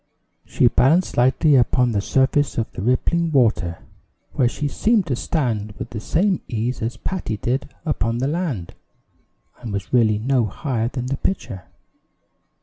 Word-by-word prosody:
She 125 Hz, -, +3 dB
balanced 155 Hz, +9 st, +3 dB
lightly 130 Hz, +5 st, +3 dB
upon 125 Hz, 0 st, +3 dB
the 100 Hz, -2 st, 0 dB
surface 135 Hz, +5 st, +1 dB
of 115 Hz, -, -1 dB
the -, -, -7 dB
rippling 160 Hz, -, +1 dB
water, 110 Hz, -, +1 dB, 0.5 s
where 125 Hz, -, +2 dB
she 145 Hz, +4 st, -3 dB
seemed 215 Hz, -, +1 dB
to 135 Hz, -, -1 dB
stand 115 Hz, -8 st, -2 dB
with -, -, -8 dB
the 110 Hz, -, -5 dB
same 185 Hz, -, +1 dB
ease 120 Hz, +2 st, -2 dB
as 115 Hz, +2 st, -3 dB
Patty 180 Hz, -, -3 dB
did 130 Hz, +7 st, -2 dB, 0.2 s
upon 115 Hz, -7 st, -1 dB
the 130 Hz, +3 st, 0 dB
land, 145 Hz, -, -3 dB, 0.9 s
and 120 Hz, -3 st, -7 dB
was 100 Hz, +2 st, -5 dB
really 110 Hz, -4 st, +4 dB
no 125 Hz, +2 st, +1 dB
higher 115 Hz, -, -2 dB
than 125 Hz, 0 st, -4 dB
the 135 Hz, +1 st, -2 dB
pitcher. 120 Hz, -, -3 dB
125 Hz, 155 wpm, -21 LUFS, 110-145 Hz, 0.9 s, really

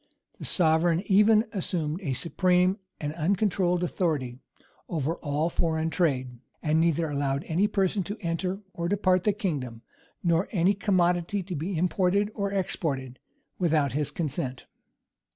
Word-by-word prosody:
[] -, -, -42 dB
The -, -, -6 dB
sovereign 165 Hz, 0 st, +2 dB
even 210 Hz, +3 st, +5 dB
assumed 170 Hz, -3 st, -2 dB
a 145 Hz, -8 st, -2 dB
supreme 180 Hz, -, +2 dB, 0.2 s
and 150 Hz, 0 st, -3 dB
uncontrolled 180 Hz, +1 st, +1 dB
authority 150 Hz, -9 st, -1 dB, 0.5 s
over 160 Hz, 0 st, -1 dB
all 150 Hz, +1 st, -1 dB
foreign 160 Hz, -1 st, 0 dB
trade; 130 Hz, -7 st, 0 dB, 0.2 s
and 155 Hz, 0 st, +2 dB
neither 165 Hz, -1 st, +2 dB
allowed 140 Hz, -1 st, -1 dB
any 180 Hz, +6 st, +1 dB
person 195 Hz, -1 st, +1 dB
to 205 Hz, +5 st, -5 dB
enter 180 Hz, +2 st, -2 dB
or 170 Hz, 0 st, -2 dB
depart 185 Hz, -2 st, +2 dB
the 210 Hz, -, +5 dB
kingdom, 145 Hz, -, -3 dB, 0.4 s
nor 170 Hz, +1 st, +2 dB
any 185 Hz, 0 st, +3 dB
commodity 185 Hz, -1 st, +1 dB
to 180 Hz, 0 st, -5 dB
be 165 Hz, +4 st, -3 dB
imported 185 Hz, +4 st, +1 dB
or 200 Hz, -1 st, -2 dB
exported, 140 Hz, -9 st, -2 dB, 0.4 s
without 155 Hz, -6 st, +2 dB
his 145 Hz, +2 st, -1 dB
consent. 145 Hz, -4 st, -4 dB
170 Hz, 140 wpm, -27 LUFS, 150-190 Hz, 0.5 s, even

